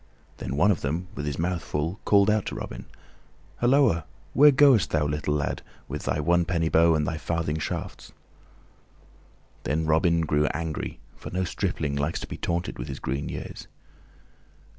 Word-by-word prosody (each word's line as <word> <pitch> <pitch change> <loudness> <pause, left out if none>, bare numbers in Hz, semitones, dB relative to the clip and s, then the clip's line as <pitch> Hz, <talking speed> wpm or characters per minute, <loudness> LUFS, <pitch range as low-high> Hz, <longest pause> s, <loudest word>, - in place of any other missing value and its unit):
Then 65 - -4
one 95 +9 +4
of 90 - -1
them, 80 +6 -2
with 75 - -5
his 75 - -2
mouth 85 0 -1
full, 80 +9 -3
called 100 -1 +5
out 105 -1 +2
to - - -4
Robin, - - -7 0.7
"Hulloa, 120 - +3 0.3
where 150 +2 +8
goest 135 - +5
thou, 75 -2 +1
little 75 0 -1
lad, 70 -4 -2 0.3
with - - -5
thy - - 0
one 85 +3 +3
penny 85 -2 0
bow 80 0 +5
and 75 -1 +1
thy 80 - -2
farthing 80 -1 -2
shafts?" - - -5 1.5
Then 80 +3 -1
Robin 85 +2 +3
grew 75 -1 +1
angry, 80 0 -4 0.2
for - - -9
no 95 +1 -1
stripling 75 -4 -2
likes 70 +3 -1
to - - -6
be - - -6
taunted 85 -4 -3
with - - -5
his 70 - -5
green 70 +2 -3
years. - - -7
80 Hz, 170 wpm, -26 LUFS, 75-90 Hz, 1.5 s, where